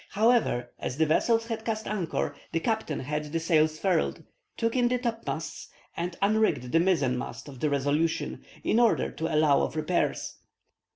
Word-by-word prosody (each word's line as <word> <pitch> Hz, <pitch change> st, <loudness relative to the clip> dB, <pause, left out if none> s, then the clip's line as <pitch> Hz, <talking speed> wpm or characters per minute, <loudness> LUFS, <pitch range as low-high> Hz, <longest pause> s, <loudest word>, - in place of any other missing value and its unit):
However, 215 Hz, -, +2 dB
as 125 Hz, -, -4 dB
the 160 Hz, -, +4 dB
vessels 225 Hz, +9 st, +2 dB
had 225 Hz, -1 st, -4 dB
cast 220 Hz, -1 st, -3 dB
anchor, 190 Hz, -6 st, -2 dB, 0.2 s
the 165 Hz, -, +2 dB
captain 220 Hz, -6 st, -1 dB
had 150 Hz, +3 st, -3 dB
the 160 Hz, +3 st, -2 dB
sails 155 Hz, -2 st, +2 dB
furled, 180 Hz, -2 st, 0 dB, 0.3 s
took 230 Hz, +1 st, 0 dB
in 245 Hz, -1 st, +3 dB
the 250 Hz, +1 st, +1 dB
topmasts, 235 Hz, -2 st, -4 dB, 0.3 s
and 170 Hz, 0 st, -3 dB
unrigged 210 Hz, -, +2 dB
the 165 Hz, -, +4 dB
mizzen 160 Hz, -8 st, +2 dB
mast -, -, -7 dB
of 135 Hz, -3 st, -10 dB
the 150 Hz, -, +1 dB
Resolution, 145 Hz, +3 st, 0 dB, 0.2 s
in 225 Hz, -, +2 dB
order 235 Hz, -2 st, +3 dB
to 165 Hz, +1 st, -3 dB
allow 150 Hz, -2 st, +4 dB
of -, -, -2 dB
repairs. 155 Hz, +3 st, -1 dB
165 Hz, 170 wpm, -28 LUFS, 150-220 Hz, 0.3 s, the